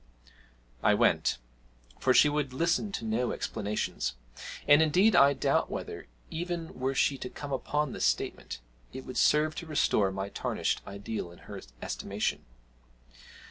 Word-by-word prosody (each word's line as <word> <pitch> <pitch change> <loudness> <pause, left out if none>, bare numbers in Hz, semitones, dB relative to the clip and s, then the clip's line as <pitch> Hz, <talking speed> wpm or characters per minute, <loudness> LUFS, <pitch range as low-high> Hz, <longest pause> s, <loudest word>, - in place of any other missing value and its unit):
I - - +4
went - - +2 0.6
for 130 - +3
she 140 - +7
would 145 -3 -1
listen 170 +8 +1
to 115 - -3
no 115 +3 0
explanations; 105 - -2 0.5
and 145 +1 +7
indeed 185 +8 +4
I 140 +1 +7
doubt 135 - +1
whether, - - -6 0.2
even 170 0 -4
were 135 +1 -1
she 135 0 +2
to 125 - -5
come 145 +1 -6
upon 150 +2 -1
this - - -4
statement, - - -1 0.3
it 130 +1 -7
would 130 - -7
serve 155 +1 +4
to 170 - -6
restore 110 -9 +2
my 95 +1 -4
tarnished - - -1
ideal 100 -2 -5
in 85 - -14
her - - -8 0.2
estimation. - - -2
135 Hz, 145 wpm, -29 LUFS, 110-155 Hz, 0.6 s, she